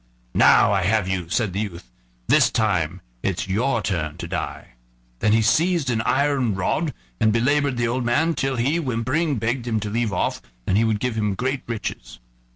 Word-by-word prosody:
"Now -, -, +5 dB
I 95 Hz, -, +2 dB
have 100 Hz, +1 st, +1 dB
you," 90 Hz, -3 st, -2 dB
said 105 Hz, 0 st, 0 dB
the 100 Hz, -, -2 dB
youth; 85 Hz, -, -6 dB, 0.4 s
"this -, -, +5 dB
time 95 Hz, -9 st, 0 dB, 0.2 s
it's 95 Hz, +2 st, -2 dB
your 115 Hz, +4 st, 0 dB
turn 80 Hz, -4 st, -2 dB
to 85 Hz, -, -6 dB
die." 90 Hz, +1 st, -5 dB, 0.5 s
Then 105 Hz, -, +2 dB
he 110 Hz, +1 st, +4 dB
seized 165 Hz, +1 st, +2 dB
an 110 Hz, -2 st, 0 dB
iron 135 Hz, -4 st, +1 dB
rod 95 Hz, -, 0 dB, 0.3 s
and 110 Hz, -, +3 dB
belabored 140 Hz, +3 st, +1 dB
the 120 Hz, -1 st, +1 dB
old 125 Hz, +2 st, -1 dB
man 150 Hz, +8 st, +2 dB
till 135 Hz, -3 st, -1 dB
he, 130 Hz, +7 st, +1 dB
whimpering, 135 Hz, +3 st, 0 dB
begged 120 Hz, +2 st, -2 dB
him 110 Hz, -2 st, 0 dB
to 105 Hz, 0 st, -4 dB
leave 115 Hz, -1 st, 0 dB
off, 90 Hz, -, -1 dB, 0.2 s
and 95 Hz, -, +1 dB
he 110 Hz, -, +4 dB
would 110 Hz, -2 st, +1 dB
give 125 Hz, 0 st, -1 dB
him 105 Hz, -3 st, -1 dB
great 130 Hz, +4 st, -2 dB
riches. -, -, -5 dB
115 Hz, 190 wpm, -23 LUFS, 95-130 Hz, 0.5 s, Now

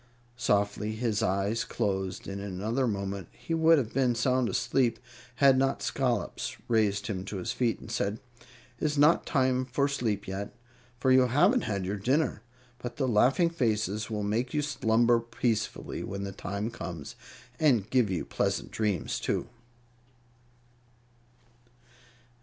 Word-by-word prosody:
Softly 105 Hz, -2 st, 0 dB
his 110 Hz, -2 st, 0 dB
eyes 100 Hz, +2 st, 0 dB
closed, 95 Hz, -4 st, -2 dB
and 100 Hz, 0 st, -5 dB
in 100 Hz, -, -5 dB
another 115 Hz, +8 st, 0 dB
moment 100 Hz, -4 st, -3 dB
he 165 Hz, -, -5 dB
would 165 Hz, 0 st, +5 dB
have 120 Hz, -6 st, -2 dB
been 125 Hz, -2 st, +2 dB
sound 125 Hz, +1 st, +1 dB
asleep 120 Hz, -4 st, +1 dB, 0.4 s
had 135 Hz, 0 st, +5 dB
not 135 Hz, 0 st, 0 dB
Scollops 120 Hz, -8 st, -1 dB
raised 105 Hz, -3 st, +2 dB
him 95 Hz, -6 st, -3 dB
to 100 Hz, +1 st, -5 dB
his 105 Hz, +5 st, -3 dB
feet 120 Hz, -2 st, 0 dB
and 110 Hz, -, -10 dB
said: 105 Hz, -1 st, -1 dB, 0.6 s
"It -, -, -2 dB
is 150 Hz, -1 st, 0 dB
not 150 Hz, +4 st, +4 dB
time 130 Hz, -3 st, +2 dB
for 130 Hz, +2 st, 0 dB
sleep 115 Hz, -8 st, -2 dB
yet, 95 Hz, +3 st, -5 dB, 0.4 s
for 130 Hz, +1 st, +2 dB
you 130 Hz, -1 st, +6 dB
haven't 180 Hz, -, +3 dB
had 100 Hz, -4 st, -2 dB
your 100 Hz, +2 st, -2 dB
dinner. 130 Hz, +4 st, +1 dB, 0.4 s
But 120 Hz, 0 st, -6 dB
the 135 Hz, -, 0 dB
laughing 130 Hz, -, +3 dB
faces 110 Hz, -, -1 dB
will 105 Hz, -2 st, -2 dB
make 115 Hz, +7 st, -1 dB
you 150 Hz, -, +1 dB
slumber 120 Hz, -4 st, +3 dB
peacefully 115 Hz, -2 st, -2 dB
when 100 Hz, 0 st, -5 dB
the 100 Hz, -, -4 dB
time 100 Hz, +4 st, -4 dB
comes, 85 Hz, -9 st, -7 dB, 0.4 s
and 125 Hz, -10 st, +3 dB
give 125 Hz, -3 st, +2 dB
you 90 Hz, -3 st, -2 dB
pleasant -, -, -1 dB
dreams, 105 Hz, -7 st, -1 dB
too." -, -, -2 dB
115 Hz, 150 wpm, -29 LUFS, 100-130 Hz, 0.6 s, you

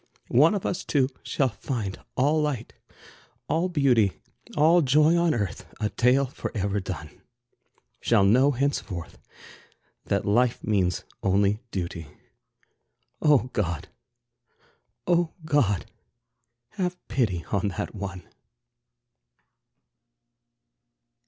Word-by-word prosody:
One 155 Hz, -, +5 dB
of 200 Hz, -, -3 dB
us 185 Hz, -, -2 dB
two 135 Hz, -3 st, +1 dB
shall 135 Hz, -2 st, 0 dB
find 105 Hz, -2 st, -4 dB, 0.2 s
all 150 Hz, +4 st, +3 dB
light, 140 Hz, -6 st, -2 dB, 0.7 s
all 170 Hz, +3 st, +1 dB
beauty, 125 Hz, -, +3 dB, 0.4 s
All 165 Hz, +4 st, +5 dB
joy 150 Hz, +4 st, +4 dB
on 170 Hz, -2 st, +2 dB
earth, 100 Hz, -7 st, -4 dB
a 105 Hz, -, 0 dB
tale 130 Hz, +3 st, +3 dB
forever 100 Hz, -5 st, -3 dB
done; 85 Hz, -5 st, -7 dB, 0.8 s
Shall 110 Hz, -4 st, +3 dB
know 125 Hz, +8 st, +5 dB
henceforth 120 Hz, -, -2 dB, 0.9 s
that -, -, 0 dB
life 120 Hz, +4 st, +2 dB
means 95 Hz, -5 st, 0 dB, 0.2 s
only 100 Hz, +2 st, +2 dB
duty. 85 Hz, -6 st, -4 dB, 1.1 s
Oh, 140 Hz, -4 st, +3 dB
God! 85 Hz, -4 st, -2 dB, 1.2 s
Oh, 175 Hz, -2 st, +2 dB
God! 125 Hz, -, +2 dB, 0.8 s
have 180 Hz, -3 st, -3 dB
pity 95 Hz, -, 0 dB
on 100 Hz, 0 st, +1 dB
that -, -, -3 dB
one. 95 Hz, -3 st, -6 dB
120 Hz, 100 wpm, -26 LUFS, 100-150 Hz, 1.2 s, One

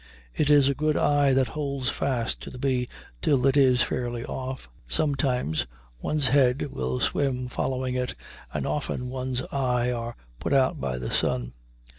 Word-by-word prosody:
It 150 Hz, -, +1 dB
is 145 Hz, -2 st, +6 dB
a 140 Hz, -, +3 dB
good 150 Hz, +2 st, +1 dB
eye 145 Hz, -1 st, +3 dB
that 130 Hz, -2 st, +2 dB
holds 140 Hz, -2 st, -2 dB
fast 130 Hz, -4 st, -1 dB
to -, -, -7 dB
the -, -, -10 dB
bee 125 Hz, -1 st, 0 dB, 0.3 s
till 135 Hz, -, +2 dB
it 135 Hz, 0 st, +4 dB
is 130 Hz, -3 st, +5 dB
fairly 120 Hz, -1 st, -3 dB
off. 130 Hz, -, -5 dB, 0.2 s
Sometimes 125 Hz, -, 0 dB, 0.3 s
one's 150 Hz, -, +2 dB
head 130 Hz, -1 st, +4 dB
will 65 Hz, -1 st, -2 dB
swim 130 Hz, -3 st, 0 dB
following 130 Hz, 0 st, -2 dB
it, 125 Hz, -1 st, -2 dB, 0.4 s
and -, -, -2 dB
often 125 Hz, -3 st, -2 dB
one's 130 Hz, -1 st, -2 dB
eyes 125 Hz, -2 st, +1 dB
are 120 Hz, 0 st, -4 dB, 0.2 s
put -, -, -1 dB
out 135 Hz, -1 st, +3 dB
by 65 Hz, -2 st, -2 dB
the 60 Hz, 0 st, -4 dB
sun. -, -, 0 dB
130 Hz, 165 wpm, -26 LUFS, 125-140 Hz, 0.4 s, is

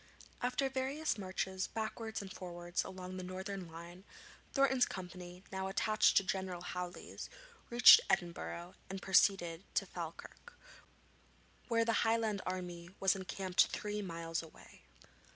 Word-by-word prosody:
After 250 Hz, +2 st, +1 dB
various 265 Hz, 0 st, -1 dB
marches 190 Hz, 0 st, -2 dB
backwards 220 Hz, 0 st, -4 dB
and 190 Hz, -, -8 dB
forwards 175 Hz, -1 st, -3 dB
along 185 Hz, -1 st, -7 dB
the 185 Hz, -, -5 dB
northern 190 Hz, 0 st, -5 dB
line, 170 Hz, +3 st, -10 dB, 0.5 s
Thornton's 265 Hz, -2 st, +4 dB
company, 180 Hz, -1 st, -8 dB
now 190 Hz, 0 st, -2 dB
attached 215 Hz, +2 st, +3 dB
to -, -, +6 dB
General 185 Hz, -2 st, -3 dB
Hawley's, 180 Hz, 0 st, -6 dB, 0.4 s
reached 245 Hz, -, +10 dB
Edinburgh 175 Hz, 0 st, -1 dB, 0.2 s
and 190 Hz, 0 st, -4 dB
proceeded 190 Hz, -3 st, +3 dB
to -, -, +2 dB
Falkirk, 480 Hz, -, -8 dB, 1.1 s
where 230 Hz, -1 st, +2 dB
the 230 Hz, -1 st, +2 dB
Highland 225 Hz, -3 st, +1 dB
army 175 Hz, -2 st, -4 dB
was 195 Hz, 0 st, +4 dB
encamped 190 Hz, -1 st, +2 dB
three 210 Hz, 0 st, -3 dB
miles 165 Hz, -3 st, -3 dB
away. 160 Hz, -1 st, -15 dB
190 Hz, 125 wpm, -35 LUFS, 180-220 Hz, 1.1 s, reached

